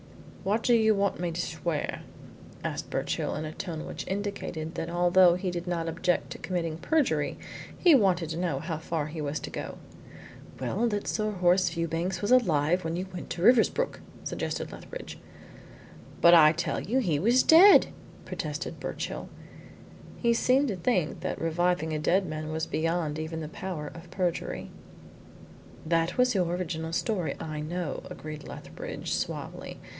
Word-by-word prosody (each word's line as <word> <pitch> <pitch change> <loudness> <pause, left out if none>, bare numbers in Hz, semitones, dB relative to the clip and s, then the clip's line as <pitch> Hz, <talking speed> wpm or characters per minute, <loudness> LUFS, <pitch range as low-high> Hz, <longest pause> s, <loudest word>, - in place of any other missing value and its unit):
"What 210 +4 0
do 245 - +4
you 220 -2 +5
want 200 0 0
me 175 -1 -1
to 165 - -5
swear?" 160 -2 -2 0.6
asked - - -4
Birchill, - - -2
in 155 - -3
a 155 - -5
tone 165 -2 -5
which - - -6
indicated 190 -5 -3
that 165 -1 -4
although 175 +1 +5
he 180 0 -2
did 175 0 -5
not 170 -2 -1
object 175 +2 0
to - - -7
committing 165 -4 -2
perjury, 170 - +1 0.4
he 350 -3 +6
wanted 185 - +3
to 160 - -3
know 170 -6 0
how 160 0 -4
far 160 -2 -2
he 155 +1 -6
was 145 0 -2
to - - -6
go. - - -6 0.8
"Well, 185 - 0
that 205 -3 -2
Sir 215 -1 0
Horace 180 -2 +3
Fewbanks 170 +3 -2
was 205 - 0
alive 175 -8 +3
when 165 +1 -2
you 180 +2 -2
went 180 - -7
to 170 +1 -4
Riversbrook," 250 - +4 0.2
suggested - - -3
Lethbridge. - - -9 1.0
"But 170 - +8
I 155 -2 +8
tell 165 - -1
you 235 +7 -1
he 175 - +1
was 235 - +4
dead," 365 +6 +8 0.4
protested - - -4
Birchill. - - -5 0.9
He 235 -1 +2
seemed 260 +4 +3
to 205 - -1
think 180 -4 0
that - - -3
reviving 165 0 0
a 155 - -1
dead 185 +5 +2
man 155 -1 -4
was 160 0 -1
beyond 160 -1 -1
even 160 +1 -4
the 155 - -4
power 160 -2 -5
of 170 0 -11
perjury. 180 -1 -2 1.1
"That 165 +4 +1
was 250 0 +4
your 185 -4 +2
original 165 -2 -3
story, 185 -3 -1
I 155 -1 -4
know," 170 +1 -3
agreed 155 -1 -8
Lethbridge - - -6
suavely. - - -4
175 Hz, 165 wpm, -28 LUFS, 160-195 Hz, 1.1 s, But